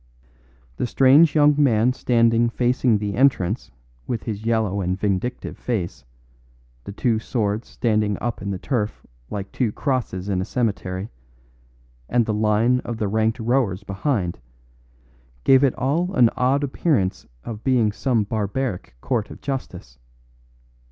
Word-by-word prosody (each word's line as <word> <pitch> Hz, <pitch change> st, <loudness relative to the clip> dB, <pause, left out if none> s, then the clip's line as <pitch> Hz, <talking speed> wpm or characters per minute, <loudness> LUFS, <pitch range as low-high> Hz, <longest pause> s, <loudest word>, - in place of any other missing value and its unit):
The -, -, -1 dB
strange 140 Hz, +6 st, +5 dB
young 150 Hz, -1 st, +6 dB
man 125 Hz, -3 st, +3 dB
standing 115 Hz, -2 st, +2 dB
facing 125 Hz, -1 st, +2 dB
the 100 Hz, -1 st, -3 dB
entrance 110 Hz, -, +1 dB, 0.4 s
with 115 Hz, -, -3 dB
his 110 Hz, -1 st, -5 dB
yellow 110 Hz, -4 st, +1 dB
and 90 Hz, +1 st, -2 dB
vindictive 105 Hz, +4 st, -2 dB
face, 90 Hz, -, -3 dB, 0.8 s
the -, -, -6 dB
two 110 Hz, +2 st, 0 dB
swords 110 Hz, -1 st, -2 dB
standing 105 Hz, -4 st, 0 dB
up 120 Hz, 0 st, -3 dB
in 100 Hz, -, -4 dB
the 95 Hz, -, -2 dB
turf 110 Hz, 0 st, -3 dB, 0.2 s
like 100 Hz, -1 st, -5 dB
two 120 Hz, -5 st, 0 dB
crosses 115 Hz, -9 st, -2 dB
in 95 Hz, -2 st, 0 dB
a -, -, -1 dB
cemetery, 100 Hz, -4 st, -2 dB, 1.0 s
and 120 Hz, -2 st, +2 dB
the 110 Hz, -, -1 dB
line 110 Hz, +4 st, +2 dB
of 120 Hz, -2 st, -5 dB
the 105 Hz, -, -1 dB
ranked 110 Hz, +2 st, +1 dB
towers 115 Hz, -5 st, 0 dB
behind, 100 Hz, -, -2 dB, 1.0 s
gave 135 Hz, 0 st, +5 dB
it 135 Hz, -, +3 dB
all 165 Hz, +9 st, -1 dB
an 120 Hz, -2 st, +5 dB
odd 135 Hz, +3 st, +1 dB
appearance 130 Hz, -, 0 dB, 0.2 s
of 110 Hz, -2 st, -7 dB
being 120 Hz, -5 st, +2 dB
some 115 Hz, +1 st, 0 dB
barbaric 105 Hz, -, -3 dB
court 120 Hz, -5 st, -1 dB
of -, -, -10 dB
justice. 130 Hz, -, -6 dB
115 Hz, 140 wpm, -22 LUFS, 100-125 Hz, 1.0 s, young